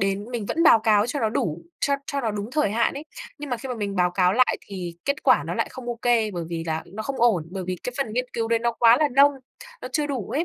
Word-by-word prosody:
đến 195 +1 0
mình 230 -5 -4
vẫn 330 - 0
báo 230 - +7
cáo 215 0 +3
cho 270 +2 -3
nó 220 - +2
đủ, 170 -6 -2 0.2
cho 280 - +2
cho 280 -1 -2
nó 225 -3 -1
đúng 210 +2 -5
thời 300 -10 +1
hạn 230 +2 +1
ấy. 285 +3 -7 0.3
Nhưng 295 -1 -7
mà 245 - 0
khi 260 +3 -8
mà 250 - -2
mình 200 -3 -4
báo 180 -1 +3
cáo 180 0 +2
lại 255 +3 +3
thì 180 -4 -6
kết 280 0 -1
quả - - +4
nó - - -3
lại - - -1
không 260 -2 -9
ô 235 -1 -3
kê 230 -3 +2
bởi 175 -3 -4
vì 165 -1 -4
là 160 -1 -2
nó 210 +4 -7
không 275 +3 -4
ổn, 195 -10 +3
bởi 185 -1 -5
vì 185 0 -2
cái 250 - -4
phần 225 -6 -2
nghiên 250 +2 -1
cứu 225 -1 -2
đấy 230 -1 +2
nó 235 +1 0
quá 230 +1 +5
là 300 -1 +2
nông, 280 +2 +5 0.5
nó - - -5
chưa 300 -2 0
đủ 265 -7 -4
ấy. 310 +4 0
225 Hz, 300 wpm, -24 LUFS, 195-255 Hz, 0.5 s, báo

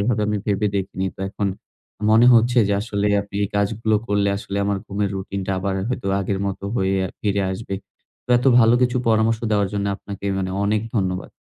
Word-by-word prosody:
এভাবে 105 +1 +1
আমি 105 - 0
ভেবে 105 0 +1
দেখিনি। 95 0 -2
তো - - -11
এখন 100 0 -1 0.6
মনে 115 +2 +6
হচ্ছে 120 +2 +4
যে, - - +1
আসলে 105 -1 -1 0.2
আপনি 100 0 -18
এই 100 - -3
কাজগুলো 110 +2 +1
করলে, 100 -1 +1
আসলে 100 -1 -6
আমার 100 0 0
ঘুমের 100 0 -2
রুটিনটা 95 0 -4
আবার 95 0 -2
হয়তো 125 -5 -3
আগের 95 0 -2
মত 95 -1 -4 0.2
হয়ে 95 -2 +1
আ - - -6
ফিরে 100 -1 0
আসবে। 100 0 -5 0.5
তো - - -8
এত 125 - -2
ভালো 115 0 +6
কিছু 125 0 +2
পরামর্শ 110 0 +3
দেওয়ার 100 -2 +2
জন্য, 100 -1 -1
আপনাকে 100 0 -9
মানে 95 -1 -2
অনেক 105 +1 +1 0.2
ধন্যবাদ। 95 -2 -1
100 Hz, 195 wpm, -22 LUFS, 100-110 Hz, 0.6 s, মনে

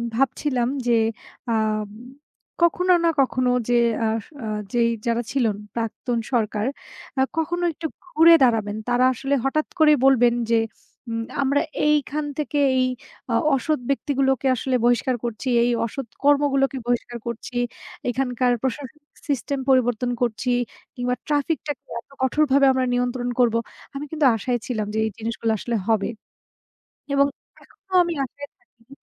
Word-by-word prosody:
ভাবছিলাম 255 0 +1 0.2
যে 240 - +4 0.6
আম 215 -1 0 0.7
কখনো 360 +2 +4
না 335 - +4
কখনো 255 -1 +2 0.2
যে 245 - +3 0.3
আস 220 0 -1 0.2
আ - - -4 0.3
যেই 235 -1 +3 0.2
যারা 235 0 +1
ছিলেন, 230 -7 +1 0.2
প্রাক্তন 235 +1 -2 0.2
সরকার। 215 -2 0 0.5
আ - - +5 0.2
কখনো 345 +2 -1
একটু 320 +2 -8 0.2
ঘুরে 335 -1 +6
দাঁড়াবেন। 220 -4 +2
তারা 245 +1 +3
আসলে 270 +3 -2
হঠাৎ 310 +3 0
করেই 300 -1 +6
বলবেন 245 -3 +5 0.2
যে, 230 - +5 0.5
উম 230 0 -2 0.2
আমরা 280 +1 +2 0.3
এইখান 300 0 +1
থেকে 295 -1 -1 0.2
এই 255 - +3 0.4
আ - - +1 0.2
অসৎ 300 +3 0
ব্যক্তিগুলোকে 270 -2 +1
আসলে 255 +2 -1
বহিষ্কার 245 +2 +2
করছি, 235 +2 -4 0.2
এই 245 - +2
অসৎ 265 +2 -6 0.2
কর্মগুলোকে 280 -1 +3
বহিষ্কার 245 0 -1
করছি। 235 +1 -6 0.5
এখানকার 250 0 0
প্রশাসনিক 270 +2 -4 0.2
সিস্টেম 280 0 -1
পরিবর্তন 245 -2 +2
করছি। 245 +1 0 0.4
কিংবা 250 0 -1
ট্রাফিকটাকে 295 -1 -1 0.2
এত 235 - -17
কঠোরভাবে 275 +1 +3
আমরা 260 -1 +1
নিয়ন্ত্রণ 245 0 -1
করবো। 230 -2 +4 0.4
আমি 285 - -4
কিন্তু 310 -2 +1
আশায় 240 +3 -1
ছিলাম 220 -4 -2
যে - - -2
এই - - 0
জিনিসগুলো 230 0 -2
আসলে 235 +3 -3
হবে। 220 -3 +2 1.0
এবং 280 0 +5 0.4
এখনও 380 -1 -9
আমি 345 -1 -2
আশায় 285 +3 -10
থাকি 240 +1 -22
255 Hz, 140 wpm, -23 LUFS, 235-285 Hz, 1.0 s, ঘুরে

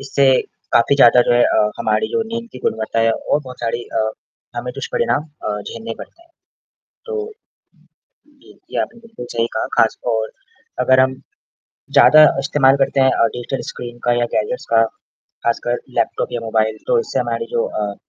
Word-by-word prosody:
इससे 135 0 +1 0.5
काफ़ी 120 +4 +4
ज़्यादा 125 -2 +7
जो 120 - +1
है 120 - +5
अ, 105 0 +2
हमारी 110 0 +1
जो 230 - 0
नींद 230 +1 -5
की - - -9
गुणवत्ता 110 +1 -1
है 115 0 +3
और 145 - -1
बहुत 125 -1 -10
सारी 120 0 -2
अ, 115 - -4 0.6
हमें - - -4
तो - - -11
दुष्परिणाम 480 - 0 0.3
अ, 105 0 -2
झेलने 115 0 -6
पड़तें 340 - -12
हैं। 340 - -29 0.8
तो 440 -1 -4 1.0
जी, 285 -2 -21
ये - - -1
आपने 235 - -6
बिल्कुल 225 - -10
सही 115 0 +1
कहा, - - 0
ख़ासतौर 110 0 +1 0.5
अगर 130 0 +4
हम 130 0 +3 0.8
ज़्यादा 155 0 +8
अ, - - 0
इस्तेमाल 135 -1 +3
करते 135 - -1
हैं 130 - +5
अ, - - +3
डिजिटल 125 +2 -4
स्क्रीन 120 -1 -8
का 120 - +2
या 120 - +2
गैजेट्स - - -1
का, 115 - +6 0.6
ख़ासकर 120 +1 0 0.2
लैपटॉप - - -1
या 120 - -2
मोबाइल 110 -1 0
तो 485 - +3
इससे 460 - -3
हमारी 460 - -2
जो 470 0 +2 0.2
अ 100 -1 -3
125 Hz, 180 wpm, -19 LUFS, -, 1.0 s, ज़्यादा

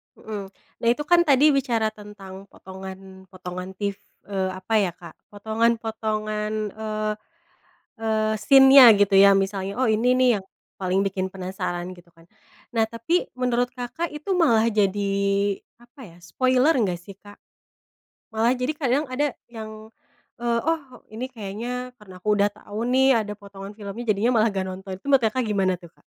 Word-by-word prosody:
Hmm. 205 -3 -7 0.3
Nah, 230 - -2
itu 295 - -5
kan 345 +2 +4
tadi 290 +2 +5
bicara 240 -5 +1
tentang 200 -2 -12
potongan-potongan 190 -1 -9
tiv 200 0 -3 0.3
eee 190 -2 -2
apa 185 +4 -6
ya 190 -3 +1
Kak, 170 -1 -13 0.2
potongan-potongan 220 -1 -1 0.2
eee, 215 -1 -3 0.9
eee 220 -1 0
scene-nya 270 +2 +8
gitu 200 -1 +3
ya 200 0 +8
misalnya 195 0 -1
oh 260 - +2
ini 225 +4 +3
nih 255 -1 +4
yang 190 - -15 0.3
paling 190 +1 +1
bikin 190 -1 -2
penasaran 185 -1 -5
gitu 175 -1 -14
kan. 165 - -20 0.5
Nah, 225 -2 +2
tapi 230 +11 -1
menurut 245 -1 0
Kakak 255 +8 -4
itu 305 +6 -5
malah 230 -10 +4
jadi 200 -1 +1 0.7
apa 240 +3 -17
ya - - -18
spoiler 255 - +2
nggak 190 -8 0
sih 190 +2 -13
Kak? 205 0 -15 1.0
Malah 225 +2 +2
jadi 250 +4 -1
kadang 280 -1 +1
ada 285 +1 -1 0.2
yang, 220 -1 -9 0.5
eee 235 -1 +1
oh 325 0 +2 0.3
ini 240 +4 -5
kayaknya 240 +4 -5
karena 195 -3 -14
aku 210 - -1
udah 205 +1 +4
tahu 205 +1 -9
nih 260 -1 +4
ada 210 0 -5
potongan 200 0 -10
filmnya 205 +3 -7
jadinya 215 +4 +2
malah 220 - +4
nggak 190 -1 -2
nonton. 190 +1 -7
Tuh - - -14
menurut 270 -3 +5
Kakak 255 +3 -1
gimana 195 -3 +1
tuh 170 -2 -15
Kak? - - -31
215 Hz, 160 wpm, -24 LUFS, 195-245 Hz, 1.0 s, scene-nya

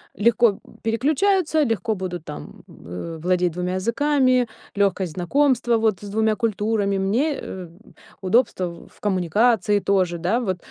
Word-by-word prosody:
легко 225 0 +3 0.2
переключаются, 310 - +2
легко 225 -3 0
будут 180 -3 -5
там, 150 - -9
э, 125 - -8
владеть 180 -1 +1
2 180 +2 -3
языками, 255 +4 +2 0.3
лёгкость 195 -4 0
знакомства 240 - +2
вот 220 -4 +1
с 205 - -8
2 220 +1 +1
культурами, 210 -3 0
мне, 240 +11 0
э, 180 -3 -7 0.5
удобства 190 -1 +2
в 170 0 -10
в - - -24
коммуникации 205 +2 +2
тоже, 185 -4 +1
да, 185 +9 0
вот. 190 -7 -2
205 Hz, 135 wpm, -22 LUFS, 185-235 Hz, 0.5 s, легко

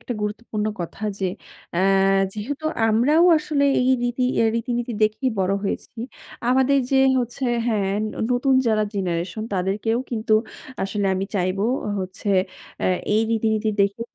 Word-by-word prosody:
একটা 245 - -5
গুরুত্বপূর্ণ 210 0 -3
কথা 175 +4 -7 0.2
যে 190 - 0 0.5
অ্যা 175 - 0 0.5
যেহেতু 270 +9 -5 0.2
আমরাও 270 +10 +4
আসলে 300 -2 0 0.2
এই 255 +1 +2
রীতি 245 +1 0
এ্যা 225 - +3
রীতিনীতি 240 +1 -2
দেখেই 215 +5 +1
বড় 190 0 +1
হয়েছি। 220 +3 -4 0.5
আমাদের 265 +2 +4
যে 270 - +3 0.2
হচ্ছে 245 +3 -4 0.2
হ্যাঁ 205 -4 0 0.4
নতুন 260 +2 +2
যারা 215 -2 +3
জেনারেশন 185 +2 -2
তাদেরকেও 200 +5 0
কিন্তু 225 -1 -1 0.5
আসলে 195 +1 -1
আমি 190 +1 -1
চাইব 185 0 0 0.4
হচ্ছে 185 +2 -6 0.5
এ্যা - - 0 0.3
এই 215 - +4
রীতিনীতি 220 -1 +1
দেখে 200 +2 +1
220 Hz, 135 wpm, -23 LUFS, 195-245 Hz, 0.5 s, আমরাও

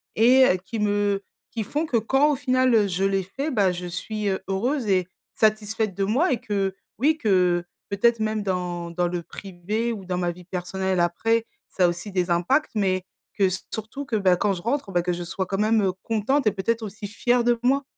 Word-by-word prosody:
et 250 +4 +6 0.2
qui 220 +4 -4
me 205 -1 +1 0.3
qui 225 - -3
font 295 +9 -2
que 255 -7 +1
quand 270 +7 +3
au - - +1
final, 255 -1 +2
heu, 210 -2 +4
je 185 0 -2
les 195 -1 +1
fais, 275 - -4
bah, 200 -7 +3
je 180 0 -5
suis 210 +4 -4
heu, 190 - -1
heureuse 235 +6 -1
et 185 -3 +2 0.3
satisfaite 215 -1 +1
de 195 - -1
moi 255 - +2
et 250 - +1
que, 195 -2 -1 0.2
oui, 310 +5 +3
que 180 - +2 0.3
peut-être 230 +3 +2
même 215 -1 -1
dans 180 -3 -3
dans 175 +1 0
le 175 0 -3
privé 200 +7 -4
ou 200 -4 -8
dans 180 -1 -2
ma 175 -1 0
vie 180 +1 -13
personnelle 190 +1 -2
après, 225 +7 +1 0.2
ça 185 - +2
a - - +6
aussi 175 +4 -5
des 180 -1 0
impacts, 220 - +2
mais 190 -3 +1 0.3
que 195 -2 +3 0.3
surtout 225 +6 -5
que, 245 - -2
bah, 190 -4 +4
quand 200 +2 +1
je 180 - -6
rentre, 240 0 -2
bah, 175 -1 +2
que 180 +1 -1
je 175 0 -4
sois 190 +2 -3
quand 195 - -2
même, 215 +1 +3
heu, 190 - +2
contente 230 +6 0
et - - +5
peut-être 225 +4 -1
aussi 210 0 -6
fière 240 +3 +1
de 240 0 +2
moi. 275 +3 +3
205 Hz, 215 wpm, -24 LUFS, 185-230 Hz, 0.3 s, et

